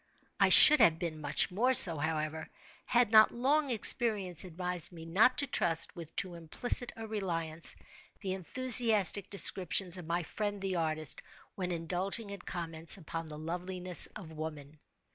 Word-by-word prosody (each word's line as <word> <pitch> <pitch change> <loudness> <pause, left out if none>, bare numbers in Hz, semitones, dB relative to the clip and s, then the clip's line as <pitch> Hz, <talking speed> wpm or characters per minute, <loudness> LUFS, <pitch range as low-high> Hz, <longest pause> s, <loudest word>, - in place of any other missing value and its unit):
I - - +3
should 305 0 +8
have 160 -1 +3
been 165 -3 -7
much 145 +5 -2
more 250 +8 +2
so, 165 -8 +10
however, 155 0 -5 0.4
had 245 -3 0
not 215 -1 +5
long 280 +4 -1
experience 210 -6 +2
advised 180 -1 -2
me 165 -2 -12
not 210 +10 +1
to 280 - +2
trust, 165 -10 -2
with 165 -2 -12
too 190 -5 -4
implicit 175 +9 -3
a 225 - -9
reliance, 170 -7 -3 0.5
the 190 -3 -5
enthusiastic 215 -1 +2
descriptions 185 -2 +1
of 175 -3 -11
my 170 +1 -3
friend, 205 +5 -6
the 190 -1 -5
artist, 155 -2 -2 0.3
when 180 -2 -6
indulging 185 +5 -5
in 200 - -9
comments 165 -1 -2
upon 165 -2 -9
the 150 - -10
loveliness 180 +3 0
of 180 -7 -11
woman. 155 -2 -10
180 Hz, 155 wpm, -30 LUFS, 165-210 Hz, 0.5 s, so